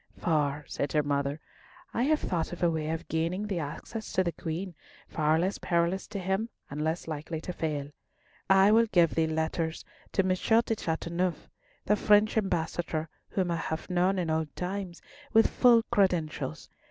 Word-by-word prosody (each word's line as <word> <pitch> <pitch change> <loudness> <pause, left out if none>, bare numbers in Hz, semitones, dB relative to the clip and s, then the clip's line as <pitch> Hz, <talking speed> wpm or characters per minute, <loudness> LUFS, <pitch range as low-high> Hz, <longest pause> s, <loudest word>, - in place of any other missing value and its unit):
"For," 150 -3 0
said 140 - -3
her 150 -1 +3
mother, 140 +1 -1 0.5
"I 235 - 0
have 305 +1 +2
thought 170 -3 -1
of 175 0 -5
a 170 - +4
way 155 -1 -2
of 165 +1 -3
gaining 170 +5 -1
thee 195 -4 -2
access 165 +9 -6
to 185 - +3
the 170 - -1
Queen, 170 +3 -5 0.3
far 155 0 +2
less 185 +4 0
perilous 170 +2 0
to 210 - -6
him, 190 +4 -1 0.2
and 145 +1 -4
less 160 +2 -2
likely 155 +1 -4
to 180 - -5
fail. 150 -4 -3 0.6
I 195 +1 +6
will 230 +1 +5
give 175 -6 +3
thee 160 -1 +2
letters 160 +1 -2 0.3
to 190 - +3
M. 185 - 0
De 225 +5 +2
Chateauneuf, 170 -1 -2 0.4
the 210 - +4
French 210 +1 +4
Ambassador, 170 -5 -1 0.2
whom 185 -3 0
I 170 - 0
have 160 +2 -4
known 180 +2 +2
in 170 -3 0
old 160 -2 -1
times, 185 -1 -4 0.3
with 225 0 +6
full 235 -2 +5
credentials. 170 - 0
170 Hz, 175 wpm, -29 LUFS, 160-195 Hz, 0.6 s, I